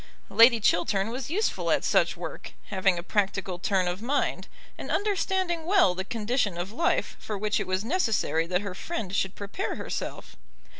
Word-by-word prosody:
Lady 230 0 +7
Chiltern 195 +1 +1
was 255 +2 -5
useful 410 +7 0
at - - +2
such - - +2
work, - - -7 0.2
having 190 -2 +2
a 170 - -4
practical 195 -2 -1
turn 185 0 +1
of 175 +3 -3
mind, 275 +5 -1 0.3
and - - -8
understanding 380 -4 0
well 360 - +4
the 190 +1 -3
condition 215 -2 -1
of 175 +3 -4
life 300 +9 0
for 210 - -5
which 210 +1 0
it - - -3
was 185 +3 -1
necessary 225 - +1
that 180 +1 0
her 200 -3 -5
friend 200 - -4
should 190 -1 0
prepare 200 - -4
herself. - - -5
210 Hz, 170 wpm, -27 LUFS, 185-270 Hz, 0.3 s, Lady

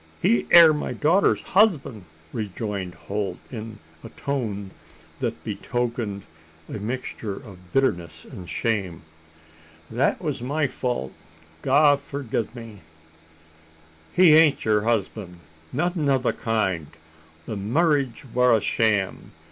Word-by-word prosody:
"He 120 +8 +2
air 165 -2 +9
my 150 - -3
daughter's 170 +7 +2
husband," 160 - +2 0.3
rejoined 100 -3 -4
Holt, 100 0 -4
in 110 -2 -7 0.3
a - - -8
tone 110 -9 -4 0.5
that - - -3
betokened 120 -5 -3 0.4
a - - -6
mixture 110 -2 -4
of 90 -7 -13
bitterness 85 -12 0
and 90 -2 -10
shame. 95 -9 -2 0.9
"That 125 +5 +1
was 150 -8 -3
my 145 +5 0
fault, 125 - -3 0.5
God 145 +1 +4
forgi' 140 -5 -3
me!" 115 -4 -10 1.3
"He 180 -4 +6
ain't 155 -2 +5
her 105 -1 +2
husband 105 -5 -2 0.3
nothin' 160 +1 0
o' 135 - +4
the 130 - 0
kind. 95 -9 -1 0.6
The 110 - -4
marriage 135 - 0
war 125 -2 +5
a - - 0
sham. 105 -2 0
115 Hz, 115 wpm, -24 LUFS, 100-140 Hz, 1.3 s, air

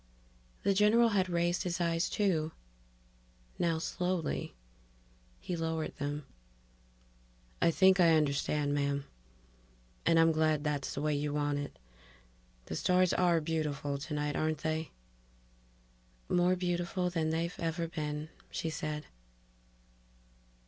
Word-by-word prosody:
The 200 - +3
general 215 +4 +5
had 190 -3 +1
raised 175 0 +1
his 175 -1 -2
eyes, 165 -1 +1
too; 165 -6 0 1.1
now, 165 -2 +2
slowly, 175 - -2 0.8
he 180 - -4
lowered 160 -1 -2
them. 145 0 -3 1.4
"I - - +5
think 190 +3 +5
I 165 -2 +6
understand, 145 0 +1
ma'am. 140 -1 0 1.0
And 165 - +4
I'm 165 0 +6
glad 155 -2 +2
that's 145 -3 -2
the 140 - -3
way 150 0 +1
you 145 0 -1
want 145 -1 0
it... 145 - -6 0.9
The 80 - -5
stars 180 - +3
are 175 -2 +3
beautiful 150 -3 -2
tonight, 150 0 -2
aren't 155 -1 -1
they." 160 0 -1 1.4
"More 180 +1 +3
beautiful 180 0 -1
than 160 -2 0
they've 165 +2 -1
ever 165 0 -1
been," 150 -1 -4 0.2
she 160 - -3
said. 150 -1 -4
160 Hz, 120 wpm, -32 LUFS, 150-175 Hz, 1.4 s, I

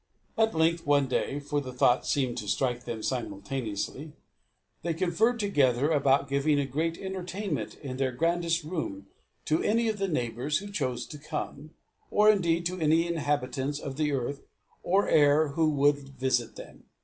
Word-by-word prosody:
At 220 -4 +2
length, 165 +1 +2
one 145 -1 +4
day, 135 +2 -1
for 145 0 -2
the 130 -2 -7
thought 125 0 +2
seemed 130 -4 0
to 105 - -7
strike 120 +4 -1
them 110 -2 -5
simultaneously, 120 +4 -4 0.7
they 170 -1 -2
conferred 195 +8 +1
together 145 - +2
about 140 -2 +3
giving 140 +1 +2
a 140 - +1
great 160 +5 -2
entertainment 185 - -4
in 130 -2 -5
their 135 -1 0
grandest 165 +4 0
rooms 150 - -4 0.4
to 155 +1 +1
any 230 +2 +2
of 215 -2 -3
their 195 - 0
neighbours 130 -1 -1
who 205 +1 -7
chose 130 -11 -2
to 150 - -10
come, 150 0 -6 0.3
or 210 +1 +6
indeed 170 -4 +1
to 180 +2 -2
any 160 +1 +3
inhabitants 145 -4 -1
of 140 -2 -6
the 150 -1 +1
earth 140 +1 -2 0.4
or 195 +3 +2
air 145 +1 +4
who 155 +2 +2
would 145 0 +3
visit 130 -3 -2
them. - - -12
145 Hz, 165 wpm, -28 LUFS, 130-170 Hz, 0.7 s, or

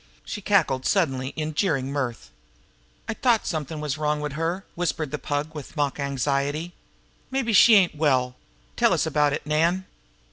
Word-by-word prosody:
She 210 - -5
cackled 170 -11 +2
suddenly 135 -9 +1
in 155 0 -3
jeering 140 -6 0
mirth. 130 - -4 0.8
"I - - -1
t'ought 235 -1 +2
something 155 -1 -3
was 150 -1 -3
wrong 150 0 0
wid 150 -1 -4
her!" 165 +5 -2
whispered 165 -4 -2
the 150 - -3
Pug 145 +2 -3
with 150 +1 -9
mock 145 -1 0
anxiety. 140 +4 -1 0.6
"Mabbe 260 -4 -1
she 225 +3 +8
ain't 190 -4 +4
well! 130 -5 +1 0.4
Tell - - +3
us - - +1
about 150 -1 +2
it, 145 - -3
Nan!" 165 +5 +1
150 Hz, 165 wpm, -25 LUFS, 140-175 Hz, 0.8 s, she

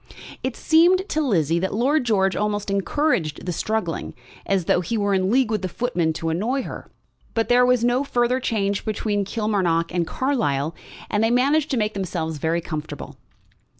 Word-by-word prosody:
It 260 -2 -3
seemed 355 +4 +4
to 310 - 0
Lizzie 170 - +1
that 190 +3 -2
Lord 260 +5 +2
George 195 -4 +2
almost 205 -1 -1
encouraged 195 - 0
the 180 - -2
struggling, 215 -2 -2 0.3
as 195 -3 +1
though 180 - +2
he 225 +7 -2
were 200 -1 +1
in 190 0 +1
league 250 0 +2
with 215 -3 0
the 185 - -3
footman 180 -8 -1
to 165 +1 -3
annoy 230 +11 -1
her. - - -8 0.5
But 225 -1 0
there 245 0 +5
was 250 -2 +3
no 245 +3 +2
further 245 -1 +1
change 205 -5 -1
between 205 -1 -1
Kilmarnock 190 -7 0
and 175 -2 0
Carlisle, 165 - 0 0.4
and 210 +1 +2
they 225 - +3
managed 280 +5 +2
to 265 - 0
make 215 -1 0
themselves 165 -5 -3
very 165 +3 0
comfortable. 155 -2 -6
210 Hz, 180 wpm, -23 LUFS, 175-250 Hz, 0.5 s, there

